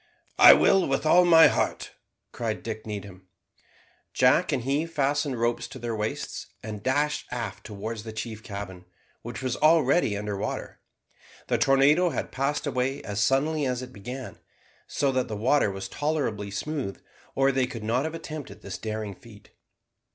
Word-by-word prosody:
"I - - +11
will, 195 -2 +4
with 135 +3 -1
all 175 +3 +6
my 165 -2 +8
heart," - - 0 0.4
cried 115 -3 -4
Dick 110 -1 -6
Needham. 100 -3 -7 0.9
Jack - - +4
and 120 - -1
he 140 +5 0
fastened 145 -4 -1
ropes 120 0 0
to 135 - -10
their 120 -2 -4
waists, 105 0 -4 0.2
and 105 -1 -6
dashed 145 +5 0
aft 120 -2 -5
towards 110 +1 -5
the 110 +1 -8
chief 110 0 -6
cabin, 100 -4 -8 0.4
which 120 +2 -7
was 130 -1 -1
already 155 -7 +3
under 105 0 -3
water. 100 - -5 0.7
The - - +1
tornado 145 +6 +4
had - - -4
passed 140 +3 -1
away 135 0 -1
as 105 -1 -4
suddenly 140 +6 +2
as 125 0 -2
it 125 - -10
began, 125 +5 -8 0.5
so 140 -1 0
that 130 -1 0
the 110 - -5
water 125 +2 +3
was 95 0 -5
tolerably 140 -9 -2
smooth, 130 +1 -4 0.4
or 135 0 +3
they 130 -1 +1
could 120 -4 -7
not 120 +5 +1
have 160 +1 -4
attempted 155 -3 -8
this - - -6
daring 110 -2 -4
feat. 105 +1 -16
125 Hz, 165 wpm, -26 LUFS, 110-145 Hz, 0.9 s, I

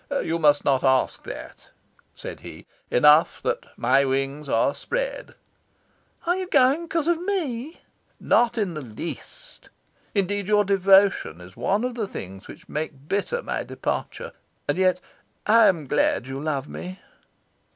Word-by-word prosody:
"You 165 +1 -1
must 145 -2 +4
not 135 -2 +2
ask 130 -1 +2
that," - - -9 0.5
said - - -8
he. - - -11 0.2
"Enough 150 +6 +5
that - - -2
my 130 +4 +3
wings 135 +2 -2
are 115 +4 +2
spread." - - -4 0.9
"Are 350 +1 +2
you 375 0 -3
going 280 +1 +3
because 330 -1 -1
of 340 -1 +1
ME?" 320 -7 -3 0.4
"Not 240 0 +2
in 200 -6 0
the 155 - -5
least. 145 - -9 0.5
Indeed, 200 0 0
your 210 0 +4
devotion 195 - +4
is 90 +1 -13
one 195 - 0
of 250 0 -2
the 225 -4 -3
things 95 - -8
which - - -13
make 150 -2 -5
bitter 205 - -1
my - - -2
departure. - - -4 0.4
And - - 0
yet 185 -1 +3 0.5
I 225 0 +6
am 170 -6 +1
glad 130 - +1
you 135 +1 -5
love 145 -2 -2
me." 185 +1 -8
185 Hz, 150 wpm, -24 LUFS, -, 0.9 s, I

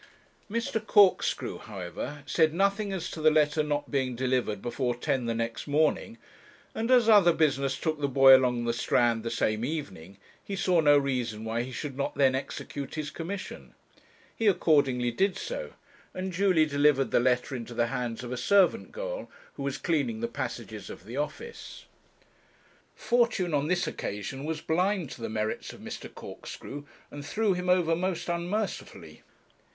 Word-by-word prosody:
Mr. 225 0 -2
Corkscrew, 205 -3 +3
however, 105 +9 -7
said 155 +2 +2
nothing 200 +2 +1
as 190 -3 -4
to 160 - -6
the 155 - +6
letter 155 0 +3
not 145 -1 -2
being 130 -3 0
delivered 125 -4 0
before 120 +2 -2
ten 130 0 -1
the 115 - -1
next 115 +3 -3
morning, 155 +10 +1 0.6
and 230 +2 -2
as 245 -3 +5
other 205 -6 +7
business 140 -4 +1
took 155 -2 -2
the 140 - +2
boy 135 0 +8
along 125 -2 +1
the 115 - +1
Strand 120 -1 +2
the 115 - -3
same 110 -1 0
evening, 100 - -5 0.3
he 200 - -5
saw 180 -2 +2
no 145 -2 +6
reason 125 -6 -1
why 115 +1 -1
he 125 +2 -6
should 140 +2 -5
not 140 - -2
then 135 -2 +4
execute 135 +1 -5
his 155 -2 -4
commission. 185 +5 -7 0.6
He 225 - 0
accordingly 140 -10 +3
did 190 - +1
so, - - -5 0.4
and 185 0 -4
duly 180 -3 +3
delivered 145 -2 +2
the - - +4
letter 125 +2 +1
into 120 -1 -7
the 120 0 +2
hands 120 -1 -3
of 125 - -6
a 125 - -3
servant 195 - +3
girl, - - -5 0.2
who - - -9
was 140 -1 -2
cleaning 170 +8 -1
the 235 - -1
passages 235 - -6
of - - -10
the - - -7
office. 465 0 -6 1.1
Fortune 235 -8 +1
on 145 0 +1
this 180 +1 +1
occasion 105 +8 -5
was 160 0 -3
blind 180 -2 0
to - - -9
the 115 - -3
merits 110 0 -3
of - - -13
Mr. - - -8
Corkscrew, 145 +1 -9 0.3
and 145 0 -7
threw 210 +6 +1
him 180 0 -3
over 175 -3 +3
most 175 0 -2
unmercifully. 180 +5 -4
145 Hz, 170 wpm, -28 LUFS, 125-185 Hz, 1.1 s, boy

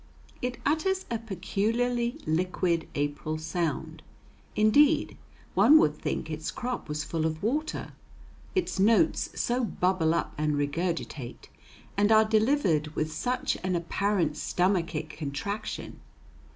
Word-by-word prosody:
It 250 0 -2
utters 375 +6 +1
a 230 - 0
peculiarly 230 +4 -1
liquid 170 0 0
April 145 +2 -2
sound. 160 -1 -3 0.5
Indeed, 285 +9 +4 0.4
one 310 - +7
would 150 - +3
think - - -3
its 155 0 -4
crop 245 -8 -4
was 150 0 -2
full 160 0 -2
of 160 +1 -2
water, 300 +8 -2 0.6
its 365 - 0
notes 230 - +3
so 245 +1 +1
bubble 180 -6 +1
up 170 - -2
and 150 -1 +1
regurgitate, 145 -3 -3 0.5
and 205 +2 +3
are 220 0 +7
delivered 215 - +2
with 155 0 -1
such 250 +9 -1
an 185 -1 0
apparent 170 -2 0
stomachic 170 -4 0
contraction. 160 +9 -5
185 Hz, 120 wpm, -28 LUFS, 155-235 Hz, 0.6 s, one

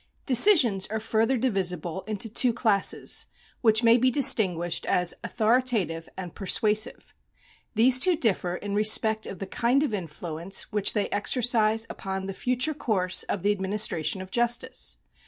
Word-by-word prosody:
Decisions 250 - +5
are 220 +1 -4
further 225 +3 -1
divisible 190 -7 -3
into 215 +1 -4
two 235 +2 +1
classes, 215 -4 0 0.3
which 220 -1 +3
may 230 +1 +5
be 255 +2 +2
distinguished 185 - +3
as 180 -1 +1
authoritative 220 -8 -1
and 180 -3 -8
persuasive. 215 +3 -1 0.6
These 250 +3 +5
two 360 +6 +3
differ 190 - -2
in 200 +2 -7
respect 215 +1 +2
of 190 - -8
the 195 - -7
kind 245 +8 0
of 285 - -3
influence 170 0 -4
which 210 -2 +1
they 210 -2 -1
exercise 225 0 0
upon 190 -2 -6
the 195 - -6
future 255 +8 -1
course 195 -10 0
of 185 - -4
the 205 - +2
administration 190 -4 -2
of 190 - -15
justice. 240 0 -1
215 Hz, 145 wpm, -25 LUFS, 190-240 Hz, 0.6 s, Decisions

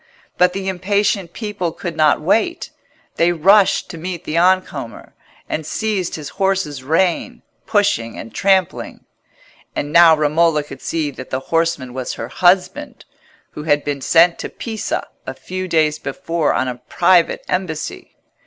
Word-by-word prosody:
But 180 0 +3
the 195 0 -4
impatient 195 -1 0
people 205 -6 -4
could 170 0 -6
not 155 -2 +3
wait. 225 - 0 0.5
They 170 +1 +3
rushed 195 +5 +4
to 165 - -9
meet 175 0 -5
the 155 - -4
on 185 +2 +4
comer, 135 -6 -9 0.3
and 155 - -3
seized 195 +2 -2
his 150 -2 -7
horse's 190 -8 -1
rein, 165 +5 0 0.2
pushing 200 - +1
and 115 - -9
trampling. 190 -3 0 0.7
And 145 +1 -3
now 170 -1 +8
Romola 155 +1 +2
could 145 - -11
see 155 -3 -2
that 130 -1 -10
the 130 - -2
horseman 165 -6 0
was 130 -1 -4
her 115 - -6
husband, 185 - +1 0.5
who - - -8
had 145 -2 +2
been 145 -1 -3
sent 170 +4 +4
to - - -5
Pisa 220 -2 -4 0.2
a - - -5
few 185 0 -5
days 155 -3 +1
before 155 +3 -2
on 130 - 0
a 125 -1 -5
private 175 -1 +3
embassy. 175 -4 -4
170 Hz, 155 wpm, -19 LUFS, 150-190 Hz, 0.7 s, now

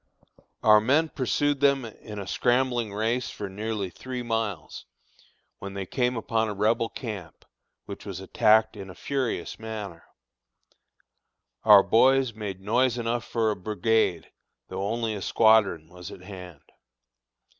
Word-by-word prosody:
Our 105 0 +7
men 145 +8 +2
pursued 145 +2 0
them 140 -2 +3
in 105 -1 -10
a 100 - -5
scrambling 120 0 +1
race 115 +4 -1
for 100 - -6
nearly 105 -1 -4
three 125 +3 -6
miles, 110 -9 -3 0.7
when 100 0 -7
they 100 -1 -4
came 125 +4 -1
upon 110 0 0
a 105 - -4
Rebel 115 +3 +1
camp, 100 - -8 0.4
which - - -8
was - - -6
attacked 110 +1 +3
in 100 -2 -8
a 90 - -10
furious 130 -10 -3
manner. 105 -6 -7 1.6
Our 105 -3 +8
boys 130 +4 +4
made 100 -3 -6
noise 120 +4 +1
enough 120 0 -2
for 115 -2 0
a - - -2
brigade, 110 +4 0 0.4
though 95 +1 -3
only 115 0 -1
a 100 - -5
squadron 105 -8 +3
was 90 0 -10
at - - -11
hand. 90 -5 -10
110 Hz, 140 wpm, -26 LUFS, 100-120 Hz, 1.6 s, Our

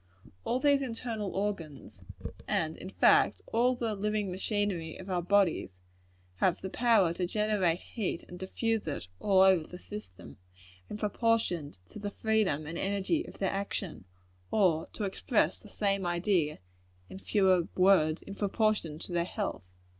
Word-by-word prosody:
All 245 - +1
these 285 0 +4
internal 230 -5 -3
organs 190 -8 -4 0.5
and, 160 0 0
in 185 - -8
fact, - - +4
all 245 +3 +3
the 230 -3 -2
living 210 -1 -1
machinery 190 -4 -1
of 190 +1 -8
our 180 -1 +1
bodies 175 - +1 0.6
have 180 - +2
the 190 - -5
power 220 -8 +3
to 180 +1 -2
generate 205 -4 +1
heat 205 -7 -3
and 180 - -10
diffuse 225 +2 -1
it 145 -11 -4
over 190 -4 +4
the 180 - -9
system, 100 - -10 0.5
in - - -5
proportion 210 -7 0 0.2
to - - -9
the 205 0 -3
freedom 205 -8 0
and 165 +3 -5
energy 200 - 0
of - - -11
their 195 - 0
action; 195 - -4 0.4
or, 175 -7 +2
to 215 - -4
express 205 +4 +1
the 210 - -14
same 195 -1 0
idea 175 -3 +1 0.5
in 190 - -9
fewer 190 -4 +3
words, 180 -4 +4
in 200 - -8
proportion 205 -5 0
to 175 - -6
their 170 -1 +1
health. 200 +3 -3
195 Hz, 150 wpm, -30 LUFS, 175-215 Hz, 0.6 s, these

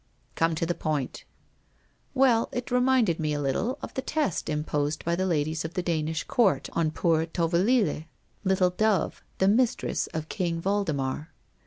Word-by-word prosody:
' - - -38
Come 165 0 +2
to 165 - -1
the 175 - 0
point.' 150 -6 -3 0.5
' - - -38 0.3
Well, 250 -4 +4
it 245 -1 -4
reminded 250 -8 +3
me 155 -1 0
a 145 - -1
little 165 - -1
of - - -6
the 265 - -2
test 295 - -1
imposed 150 0 -1
by 170 +1 +1
the 185 +2 0
ladies 155 -2 0
of 160 +2 -6
the 180 - -1
Danish 160 -2 -1
court 225 -6 +2
on 165 -2 +1
poor 160 0 +1
Tovelille, 175 +2 +1 0.4
Little 185 -2 +3
Dove, 205 -2 +1 0.2
the 190 - +3
mistress 230 +4 +1
of 155 -1 -5
King 170 -3 -2
Waldemar. 160 -7 -1
170 Hz, 170 wpm, -27 LUFS, 155-205 Hz, 0.5 s, Well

